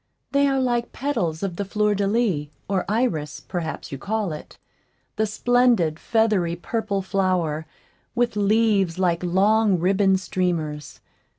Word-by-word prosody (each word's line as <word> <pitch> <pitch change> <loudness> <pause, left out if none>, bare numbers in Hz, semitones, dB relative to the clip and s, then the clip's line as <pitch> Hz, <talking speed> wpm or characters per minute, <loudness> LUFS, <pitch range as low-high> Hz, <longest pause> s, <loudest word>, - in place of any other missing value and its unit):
They 280 0 +3
are 270 -1 +1
like 240 -2 0
petals 180 - -2
of 180 -3 -3
the 200 - -1
fleur 210 +1 +1
de 200 0 0
lis, 200 -9 +1 0.2
or 195 -2 0
iris, 170 - -1
perhaps 165 -3 -5
you 135 - -5
call 210 +1 -2
it 150 - -10 0.6
the 220 0 +1
splendid, 225 -8 +2
feathery, 210 -7 +1
purple 200 +2 -2
flower, 180 -5 0 0.5
with 240 -2 +1
leaves 205 -4 +2
like 175 -2 +1
long 200 +3 +3
ribbon 190 +2 +3
streamers. 170 -5 -3
195 Hz, 135 wpm, -23 LUFS, 170-220 Hz, 0.6 s, They